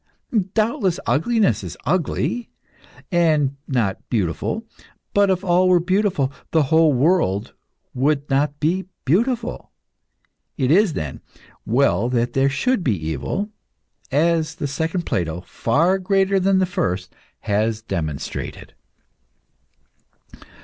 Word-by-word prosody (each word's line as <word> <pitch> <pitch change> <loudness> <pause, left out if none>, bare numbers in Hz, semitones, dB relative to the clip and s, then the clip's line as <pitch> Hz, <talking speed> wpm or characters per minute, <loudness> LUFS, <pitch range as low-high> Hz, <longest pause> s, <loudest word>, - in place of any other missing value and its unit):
Doubtless 215 -5 +1
ugliness 215 +7 +2
is - - -7
ugly, 185 - -1 0.6
and 155 -6 +2
not 115 -9 0
beautiful; 105 - -1 0.5
but 200 -1 +4
if 185 0 +1
all 185 0 +3
were 180 -1 +5
beautiful, 180 -6 +1 0.2
the 160 -2 +3
whole 155 - +3 0.5
would 140 +2 +1
not 145 +2 0
be 180 +5 0 0.2
beautiful. 230 - 0 0.9
It 130 -1 +1
is, 195 0 +4
then, 75 - -5 0.5
well 120 -3 +2
that 120 -1 0
there 135 +1 +3
should 195 - 0
be 95 - -1
evil, 80 - -3 0.6
as 160 +2 +1
the - - -4
second 160 +5 -2
Plato, 85 -1 -2
far 165 - +1
greater 195 +1 +2
than 190 +1 +3
the 190 - +3
first, 90 - -2 0.3
has 110 +2 0
demonstrated." 80 -9 -5
155 Hz, 110 wpm, -21 LUFS, 120-185 Hz, 0.9 s, were